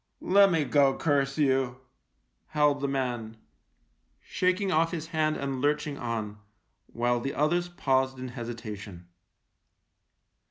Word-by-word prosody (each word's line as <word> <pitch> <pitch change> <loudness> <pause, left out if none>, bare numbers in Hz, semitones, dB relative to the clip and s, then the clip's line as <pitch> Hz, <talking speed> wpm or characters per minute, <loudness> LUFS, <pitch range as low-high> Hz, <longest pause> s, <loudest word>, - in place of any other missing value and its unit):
" - - -49
Lemme 195 -6 +6
go, 140 -2 +3
curse 140 -2 +1
you," 130 -4 +1 0.7
howled 150 -2 +2
the 140 - 0
man, 120 -5 -3 0.8
shaking 185 +1 0
off 165 0 +3
his 165 -1 -5
hand 155 -2 0
and 135 -2 -3
lurching 145 0 0
on 110 -3 -4 0.2
— - - -48
while 120 +1 0
the 135 +3 -4
others 175 +4 +1
paused 130 -6 0
in 130 0 -6
hesitation. 110 -7 -7
135 Hz, 125 wpm, -28 LUFS, 120-155 Hz, 0.8 s, Lemme